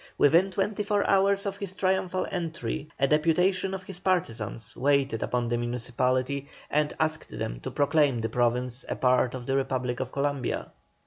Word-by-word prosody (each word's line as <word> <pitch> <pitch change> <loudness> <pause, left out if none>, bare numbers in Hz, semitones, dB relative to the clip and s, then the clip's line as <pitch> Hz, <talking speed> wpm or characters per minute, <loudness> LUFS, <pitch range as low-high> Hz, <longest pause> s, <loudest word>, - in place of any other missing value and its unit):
Within 170 +6 +5
twenty 200 +2 -1
four 205 0 +1
hours 195 +1 +3
of 200 0 -3
his 200 -2 -5
triumphal 185 -1 0
entry 165 -3 -3
a 135 - +4
deputation 180 +6 +2
of 190 - -7
his 185 -2 -9
partisans 115 - -2
waited 140 -4 +2
upon 120 -1 0
the 120 0 0
municipality 125 +3 -1 0.2
and 150 0 +2
asked 155 0 -1
them - - -3
to - - -5
proclaim 145 -3 +2
the 115 0 -2
Province 125 +2 0
a - - -1
part 125 0 +2
of 125 -2 -6
the 135 - 0
Republic 130 -2 -1
of 130 -1 -3
Columbia. 140 -1 -2
145 Hz, 170 wpm, -27 LUFS, 125-185 Hz, 0.2 s, Within